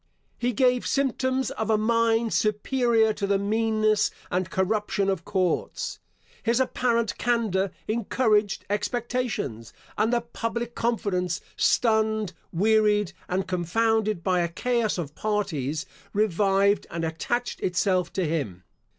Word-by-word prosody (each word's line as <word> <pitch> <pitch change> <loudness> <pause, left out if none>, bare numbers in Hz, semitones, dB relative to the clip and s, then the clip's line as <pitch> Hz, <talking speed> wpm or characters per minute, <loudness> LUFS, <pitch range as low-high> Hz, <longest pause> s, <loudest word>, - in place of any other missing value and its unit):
He 245 +1 +1
gave 250 +1 +2
symptoms 265 -1 0
of 220 0 -3
a 220 - +4
mind 230 +1 +2
superior 220 +1 +2
to 200 -1 -3
the 200 0 +3
meanness 215 +1 +2 0.2
and 185 0 0
corruption 200 +1 0
of 190 -4 -3
courts. 185 -3 -1 0.4
His 235 +2 +1
apparent 240 -3 0
candour 220 -5 +1 0.2
encouraged 215 -2 +1
expectations; 210 - -2 0.3
and 220 +2 +2
the 240 -1 +2
public 235 0 -4
confidence, 190 -8 -1 0.2
stunned, 220 -4 +2 0.2
wearied, 210 0 +3 0.2
and 185 +1 -1
confounded 215 +2 +1
by 185 -1 +2
a 170 - +1
chaos 235 +5 0
of 155 -5 -4
parties, 165 -8 -2 0.3
revived 200 0 +2
and 165 0 -3
attached 240 +10 -2
itself 185 0 +1
to 185 - 0
him. 135 - -3
215 Hz, 120 wpm, -26 LUFS, 185-230 Hz, 0.4 s, a